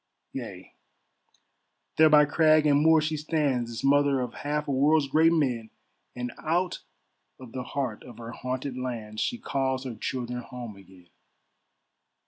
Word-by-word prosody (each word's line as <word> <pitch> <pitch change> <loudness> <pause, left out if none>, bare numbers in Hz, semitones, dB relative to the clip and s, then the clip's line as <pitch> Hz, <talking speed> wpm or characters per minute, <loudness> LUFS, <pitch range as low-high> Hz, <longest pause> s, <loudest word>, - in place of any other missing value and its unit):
Yea, - - -8 1.2
there 155 0 +7
by 150 -1 +7
crag 155 +1 +4
and 145 -1 +4
moor 160 +1 +6
she 155 0 -1
stands, 145 -6 0
This 115 - -6
mother 140 0 +3
of 125 -2 -3
half 150 +1 -3
a - - -1
world's 145 +2 +3
great 160 +4 +4
men, 125 -9 0 0.5
And 125 0 -4
out 175 +3 0 0.6
of 130 -3 -11
the 130 - -4
heart 125 -3 -3
of 120 -3 -12
her 115 0 -8
haunted 130 +1 -4
lands 115 -4 -4
She 245 - -1
calls 135 - -1
her 130 -3 -5
children 125 +2 -4
home 120 -3 -8
again. 95 -2 -17
135 Hz, 150 wpm, -27 LUFS, 120-150 Hz, 1.2 s, there